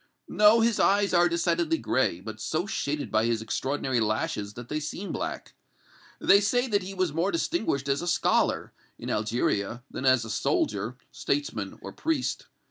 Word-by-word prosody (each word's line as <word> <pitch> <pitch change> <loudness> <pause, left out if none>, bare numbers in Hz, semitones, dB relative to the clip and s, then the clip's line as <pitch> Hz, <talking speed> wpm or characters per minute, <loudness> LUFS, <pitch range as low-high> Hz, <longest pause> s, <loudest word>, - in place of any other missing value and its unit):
"No, 210 +2 +5
his 230 -1 +2
eyes 200 0 +3
are 175 0 +5
decidedly 170 -1 +1
gray, 110 - 0
but 110 +2 -8
so 160 +4 -1
shaded 150 -8 -3
by 110 +1 +2
his 115 -1 +1
extraordinary 130 +3 -1
lashes 105 -1 -1
that 120 0 -8
they 150 +3 -2
seem 165 +6 -5
black. - - -5 0.7
They 200 +1 +5
say 245 +5 +2
that 205 -4 +1
he 190 +1 -7
was 185 -5 0
more 170 +5 +1
distinguished 220 - -1
as 140 0 +1
a 175 - -4
scholar, 175 - +1 0.2
in - - -5
Algeria, 110 +1 -1
than 135 - -2
as 130 -3 +4
a 110 - -5
soldier, 105 +3 -1
statesman 115 -9 -3
or - - -6
priest. 315 -5 -2
145 Hz, 170 wpm, -27 LUFS, -, 0.7 s, No